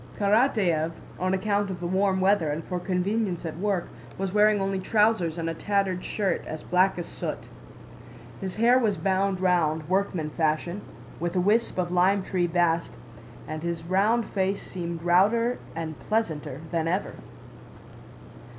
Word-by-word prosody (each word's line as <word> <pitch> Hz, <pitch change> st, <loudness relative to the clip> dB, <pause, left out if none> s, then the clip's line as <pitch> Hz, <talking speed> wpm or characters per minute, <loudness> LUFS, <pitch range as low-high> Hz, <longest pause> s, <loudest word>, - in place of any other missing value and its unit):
Karatáev, 200 Hz, -, +2 dB, 0.3 s
on 185 Hz, +1 st, +1 dB
account 205 Hz, +1 st, 0 dB
of 185 Hz, -2 st, -5 dB
the 175 Hz, -, -5 dB
warm 190 Hz, +1 st, +1 dB
weather 190 Hz, -4 st, +3 dB
and 150 Hz, +2 st, -3 dB
for 180 Hz, +1 st, -3 dB
convenience 185 Hz, 0 st, -1 dB
at 160 Hz, 0 st, -5 dB
work, 195 Hz, -3 st, 0 dB, 0.3 s
was 195 Hz, -1 st, -3 dB
wearing 210 Hz, 0 st, +4 dB
only 195 Hz, 0 st, -1 dB
trousers 210 Hz, -4 st, +2 dB
and 165 Hz, -1 st, -2 dB
a 165 Hz, -, -1 dB
tattered 195 Hz, 0 st, -1 dB
shirt 200 Hz, -3 st, -1 dB
as 155 Hz, -, -6 dB
black 185 Hz, +1 st, +2 dB
as 175 Hz, -, -3 dB
soot. -, -, -4 dB, 1.0 s
His 190 Hz, -1 st, -5 dB
hair 240 Hz, +3 st, +5 dB
was 215 Hz, -5 st, +1 dB
bound 190 Hz, 0 st, 0 dB
round, 160 Hz, -4 st, +1 dB
workman 185 Hz, -4 st, 0 dB
fashion, 160 Hz, +5 st, -1 dB, 0.4 s
with 175 Hz, +2 st, -2 dB
a -, -, +3 dB
wisp 210 Hz, +5 st, +2 dB
of 175 Hz, -1 st, -1 dB
lime 185 Hz, +2 st, +3 dB
tree 180 Hz, -2 st, 0 dB
bast, 165 Hz, -6 st, +1 dB, 0.5 s
and 155 Hz, 0 st, -5 dB
his 170 Hz, -1 st, -3 dB
round 205 Hz, +7 st, +2 dB
face 195 Hz, 0 st, -1 dB
seemed 170 Hz, -2 st, -5 dB
rounder 215 Hz, +8 st, +3 dB, 0.2 s
and 160 Hz, -2 st, -5 dB
pleasanter 160 Hz, -, -2 dB
than 165 Hz, -1 st, 0 dB
ever. 185 Hz, +4 st, -1 dB
185 Hz, 155 wpm, -26 LUFS, 170-200 Hz, 1.0 s, hair